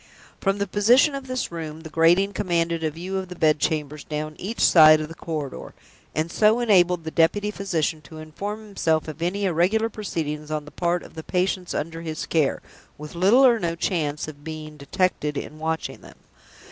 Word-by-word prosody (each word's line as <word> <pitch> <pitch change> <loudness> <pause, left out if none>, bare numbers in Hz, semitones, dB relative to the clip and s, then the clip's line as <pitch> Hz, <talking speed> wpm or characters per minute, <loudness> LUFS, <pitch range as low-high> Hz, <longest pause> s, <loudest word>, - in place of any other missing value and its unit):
From 195 0 0
the 200 - 0
position 235 - +4
of 275 -1 -6
this 255 -6 -3
room, 160 -2 -6
the 160 - -9
grating 175 +5 +3
commanded 170 -4 0
a 160 - +1
view 180 +5 -5
of 190 - -6
the 180 - -7
bed 155 -3 +2
chambers 150 -1 -2
down 155 0 -5
each 215 +5 -5
side 155 -2 +7
of 155 0 -5
the - - -8
corridor, 155 -5 -6 0.4
and 160 +2 -1
so 215 +4 +4
enabled 180 -7 +3
the 160 - -5
deputy 205 +6 +2
physician 165 -6 -2
to 155 +3 -13
inform 200 +8 -6
himself 160 -7 0
of 155 +1 -8
any 195 +4 -1
irregular 190 +6 +2
proceedings 155 -8 -4
on 155 -1 -3
the 150 - -12
part 175 0 -1
of - - -13
the 160 - -7
patients 180 +1 -1
under 165 +1 -4
his 160 -2 -4
care, 155 -5 0 0.3
with 150 0 -9
little 200 +10 +5
or 240 -3 +5
no 170 -3 -2
chance 155 -4 -2
of 145 -2 -10
being 155 -1 -7
detected 150 0 -1
in 155 - -6
watching 160 +1 -3
them. - - -15
165 Hz, 195 wpm, -24 LUFS, 155-195 Hz, 0.4 s, side